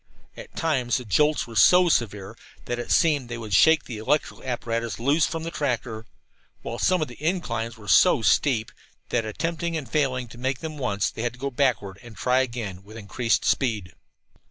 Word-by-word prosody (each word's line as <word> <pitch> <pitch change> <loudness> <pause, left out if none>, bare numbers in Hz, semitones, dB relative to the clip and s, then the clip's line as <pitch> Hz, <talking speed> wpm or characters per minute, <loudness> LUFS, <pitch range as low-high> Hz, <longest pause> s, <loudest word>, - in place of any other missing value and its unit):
At - - -12
times 130 -7 0
the 125 - -7
jolts 150 - +2
were 115 - -11
so 180 +7 +6
severe 105 - -1 0.3
that 120 0 -3
it 120 - -6
seemed 145 -7 +2
they 120 - -4
would 110 -3 -6
shake 160 - +5
the 115 -4 -7
electrical 145 +8 -1
apparatus 115 -2 -3
loose 145 +7 +2
from 165 -1 -4
the 165 - -4
tractor, 120 -6 -3 0.6
while 115 - -5
some 185 -3 +2
of - - -5
the 125 +4 -13
inclines 120 -10 -2
were 105 -2 -14
so 100 +3 +5
steep 120 -5 +2 0.4
that, - - 0
after 110 -1 -4
attempting 165 +6 -2
and 145 -5 -6
failing 130 -5 0
to 120 - -12
make 130 +1 -1
them 155 0 -7
once, 105 -6 -1
they - - -7
had 120 0 -2
to 125 - -16
go 140 +1 -3
backward 120 -7 0
and 120 -3 -13
then - - -14
try 125 0 +2
again, 115 -8 -3
with 110 +3 -12
increased 115 +3 -1
speed. 110 -9 0
125 Hz, 205 wpm, -25 LUFS, 115-150 Hz, 0.6 s, so